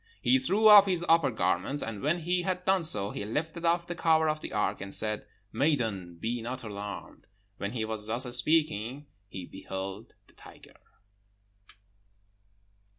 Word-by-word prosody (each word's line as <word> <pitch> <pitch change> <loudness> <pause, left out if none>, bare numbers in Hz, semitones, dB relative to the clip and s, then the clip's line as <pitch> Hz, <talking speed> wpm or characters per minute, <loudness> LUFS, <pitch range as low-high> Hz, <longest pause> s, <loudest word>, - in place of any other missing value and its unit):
He 265 - +3
threw 220 -4 +3
off 205 -2 +9
his 175 -2 0
upper 165 -2 +4
garment. 145 +2 -1
And 110 -3 -5
when 155 +5 +1
he 180 +2 0
had 180 0 -3
done 190 -1 +3
so, 105 -11 0
he - - -5
lifted 160 - -3
off 170 +1 +2
the 175 - -4
cover 160 -2 +3
of 155 0 -2
the - - -6
ark, 105 -2 -1
and 100 0 -6
said, 105 +1 -3 0.3
'Maiden, 110 - 0
be 115 +7 -3
not 125 +2 -5
alarmed!' 100 -2 -8 0.3
When 100 +3 -4
he 110 -3 -2
was 110 -1 -4
thus 120 +3 +1
speaking, 140 -2 +1 0.2
he 95 -2 -7
beheld 95 +3 -7
the - - -25
tiger. - - -16
130 Hz, 160 wpm, -29 LUFS, 105-170 Hz, 0.3 s, off